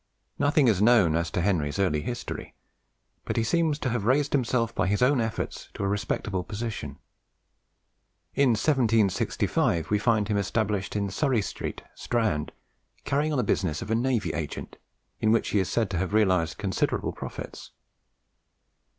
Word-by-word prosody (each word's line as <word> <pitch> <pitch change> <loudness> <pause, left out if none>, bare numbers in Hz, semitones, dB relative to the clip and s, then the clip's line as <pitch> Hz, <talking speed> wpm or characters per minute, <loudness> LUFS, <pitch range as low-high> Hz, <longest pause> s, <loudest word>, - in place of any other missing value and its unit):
Nothing 145 -1 +3
is 105 -4 +3
known 105 -8 +5
as 85 0 0
to 85 - -1
Henry's 85 -6 0
early 90 -6 +1
history; 120 +8 -6 0.7
but - - -3
he 115 - +2
seems 160 +4 +1
to 135 - -2
have 120 -3 -1
raised 135 +5 +2
himself 120 -3 +1
by - - 0
his 105 +5 +1
own 130 -1 +4
efforts 110 -1 -4
to - - -4
a - - +1
respectable 100 -2 -2
position. 105 - -5 1.4
In 140 -2 +3
1765 110 - +1
we 105 - +3
find 110 -2 +2
him 105 -2 0
established 100 -1 -1
in 100 -1 -1
Surrey 130 -2 +1
Street, - - -5
Strand, 110 -11 -1 0.5
carrying 145 +3 +1
on 150 - 0
the 125 - +2
business 90 -7 0
of 105 - -6
a - - +3
navy 120 -1 0
agent, 80 -3 -5 0.4
in 110 - +2
which 115 - +2
he 105 - +2
is 95 - 0
said 110 -4 0
to 90 - -1
have 95 +2 -1
realized 90 -6 +2
considerable 95 -4 -1
profits. - - -8
110 Hz, 160 wpm, -27 LUFS, 95-120 Hz, 1.4 s, known